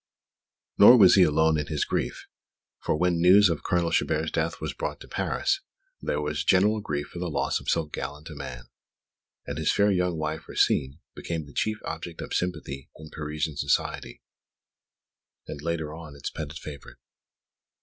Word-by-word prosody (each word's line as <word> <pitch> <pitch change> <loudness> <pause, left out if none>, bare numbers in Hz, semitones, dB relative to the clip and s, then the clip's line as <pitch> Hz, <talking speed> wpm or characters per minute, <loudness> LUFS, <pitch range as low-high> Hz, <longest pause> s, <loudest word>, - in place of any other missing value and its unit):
Nor 125 - +10
was 95 -5 +8
he 95 - +6
alone 80 -1 +4
in 75 - -3
his 75 -2 -1
grief - - -3 0.5
for - - 0
when 90 +3 +2
the - - -2
news 95 +3 +7
of 80 -3 -2
Colonel 85 -2 0
Chabert's 80 -1 0
death 80 0 -1
was - - -4
brought - - -4
to - - -11
Paris, 390 0 -1 0.4
there - - -1
was 75 0 -2
general 100 +7 +3
grief 75 -7 -3
for 85 - -8
the 90 0 -2
loss 75 - 0
of - - -6
so 85 -1 +1
gallant 75 +1 -6
a - - -7
man; 65 -4 -7 0.8
and 70 +2 -5
his 80 - +2
fair 100 0 +3
young 90 -2 0
wife, 80 0 -4
Rosine, 70 +2 +1 0.2
became 80 -3 -4
the 70 - -15
chief 110 0 0
object 80 +1 -6
of - - -6
sympathy 80 -6 -3
in 80 0 -11
Parisian 75 -1 -4
society, 70 0 -1 1.2
and, 70 - -7
later 80 -1 -3
on, 80 -3 -10
its 70 - -5
petted 75 -1 -6
favourite. 75 -2 -10
80 Hz, 175 wpm, -26 LUFS, 75-90 Hz, 1.2 s, Nor